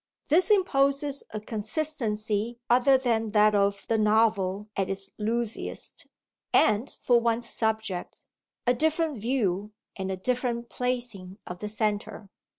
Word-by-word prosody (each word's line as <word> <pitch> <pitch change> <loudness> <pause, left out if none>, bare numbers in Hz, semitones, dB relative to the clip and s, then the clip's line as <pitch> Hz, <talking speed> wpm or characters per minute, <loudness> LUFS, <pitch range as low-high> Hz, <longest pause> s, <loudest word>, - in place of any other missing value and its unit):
This 350 +7 +4
imposes 280 -7 +2
a 215 - -5
consistency 220 -1 -2
other 255 +2 +6
than 230 -4 0
that 210 0 +5
of 200 -1 +1
the 225 -1 +1
novel 210 -2 +2
at 195 -1 -1
its 195 0 -4
loosest, 225 +1 -3 0.4
and, 220 +5 +3
for 240 -1 +4
one's 235 0 0
subject, 220 -6 -3 0.4
a 245 - +4
different 315 0 0
view 210 -4 -1 0.2
and 190 -1 -3
a 190 - -3
different 240 +2 -1
placing 240 -7 -3
of 180 0 -7
the 210 - -4
centre. 210 -1 -2
225 Hz, 130 wpm, -27 LUFS, 205-250 Hz, 0.4 s, other